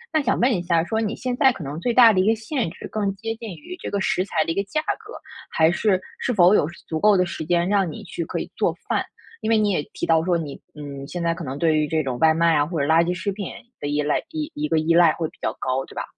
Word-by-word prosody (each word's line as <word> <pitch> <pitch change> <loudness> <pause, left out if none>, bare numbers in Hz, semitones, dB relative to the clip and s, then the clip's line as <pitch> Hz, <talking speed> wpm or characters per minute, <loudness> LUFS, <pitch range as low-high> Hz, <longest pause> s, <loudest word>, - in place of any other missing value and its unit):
那 310 - +4
想 260 - 0
问 245 +1 +3
一 180 - -1
下 170 -2 +2
说 220 +5 -1
你 215 0 -2
现 250 0 -3
在 265 -2 +5
可 195 - -9
能 140 +2 -5
最 240 - 0
大 235 -3 +8
的 185 - +2
一 190 - +1
个 225 - +4
限 220 - -2
制 165 - -9
更 205 -2 -1
接 225 +2 -4
近 225 -1 -8
于 355 +4 -9
这 - - -4
个 200 - -1
食 185 -1 +1
材 160 -5 0
的 165 - -1
一 - - -3
个 200 - 0
价 305 +9 -1 0.2
格， - - -12 0.4
还 160 0 +4
是， 190 +1 +1 0.2
是 250 - -1
否 185 -3 +5
有 150 - +3 0.2
足 160 - -2
够 210 -2 +5
的 180 - +3
时 170 -2 -5
间 175 +1 +1
让 195 -4 +1
你 - - -8
去 170 - -5
可 - - -5
以 - - -5
做 - - +1 0.2
饭？ - - +1 0.4
因 220 - -2
为 225 - +4
你 210 -1 +2
也 165 - +1
提 - - -3
到 160 -1 +3
说， 175 -1 +1
你， 150 -4 -6
嗯， 140 -2 -7
现 175 +1 -5
在 170 - +1
可 165 0 -7
能 135 0 -5
对 160 -2 +3
于 150 - +2
这 160 +1 0
种 130 -3 -3
外 160 0 +5
卖 165 0 +3
啊、 145 - +3
或 165 -3 -3
者 140 - +1
垃 160 +1 +5
圾 175 - -1
食 180 +3 -3
品 200 -1 -5 0.3
的 145 - -3
依 150 0 0
赖 150 - +1
一 310 -2 -4
一 300 +1 -2
个 - - +2
依 165 +2 +2
赖 170 -1 +6
会 165 - -2
比 - - -25
较 - - 0
高， 130 +1 -1
对 - - -15
吧？ - - -3
175 Hz, 325 characters per minute, -23 LUFS, 160-220 Hz, 0.4 s, 大